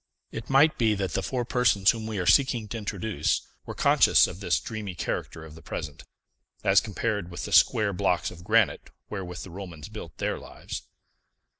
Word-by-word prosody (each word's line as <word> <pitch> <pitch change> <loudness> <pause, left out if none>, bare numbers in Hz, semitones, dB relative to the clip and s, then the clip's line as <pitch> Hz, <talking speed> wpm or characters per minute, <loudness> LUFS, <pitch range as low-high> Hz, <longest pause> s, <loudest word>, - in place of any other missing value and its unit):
It 115 - -7
might 140 +4 +4
be 110 -3 +3
that 95 -3 -2
the - - 0
four 125 -2 -2
persons 115 -6 +3
whom 110 -1 -6
we 110 -2 -4
are 90 - -1
seeking 125 -1 +3
to 115 - -4
introduce 100 -5 -1 0.2
were - - -6
conscious - - +5
of - - -7
this - - +1
dreamy 105 -4 -6
character 80 -1 -4
of 80 - -12
the 80 - -13
present, 75 -3 -7 0.6
as 95 0 +5
compared 105 -4 -2
with 85 - -6
the - - -7
square 100 -2 +4
blocks 90 -1 0
of 85 -1 -12
granite 110 +1 +2 0.2
wherewith 90 -4 -5
the 95 - -10
Romans 90 -3 -8
built 105 -7 -9
their - - -2
lives. - - -8
100 Hz, 185 wpm, -27 LUFS, 90-110 Hz, 0.6 s, conscious